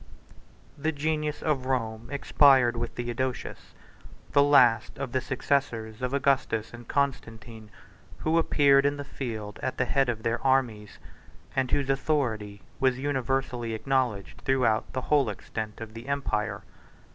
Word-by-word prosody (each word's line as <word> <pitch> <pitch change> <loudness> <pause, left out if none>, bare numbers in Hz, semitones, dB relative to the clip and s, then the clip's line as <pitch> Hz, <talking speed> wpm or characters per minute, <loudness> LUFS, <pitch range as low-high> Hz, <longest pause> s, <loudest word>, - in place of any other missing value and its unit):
The 155 +3 0
genius 150 0 -2
of 135 -5 0
Rome 115 -4 -2
expired 135 -3 +4
with 120 0 -4
Theodosius; 120 +1 -4 0.6
the 145 - +5
last 135 -5 +4
of 135 -2 -4
the 130 - 0
successors 125 -4 -1
of 125 0 -1
Augustus 135 -6 0
and 120 -1 -11
Constantine, 115 -5 -3 0.5
who 160 +1 +1
appeared 140 -4 +4
in 145 +1 +1
the 145 - -4
field 110 -7 -6
at 130 - -3
the 130 - +1
head 135 0 +1
of 110 -2 -3
their 115 0 -1
armies, 125 -6 0 0.6
and 130 -1 +1
whose 140 +2 0
authority 115 -8 -1 0.2
was 130 -1 +2
universally 130 -4 -1
acknowledged 125 -5 -1
throughout 125 -4 +1
the 130 - -2
whole 140 -3 +2
extent 105 +1 -6
of 110 -1 -8
the 115 +3 -9
empire. 135 -7 -2
130 Hz, 140 wpm, -27 LUFS, 115-140 Hz, 0.6 s, the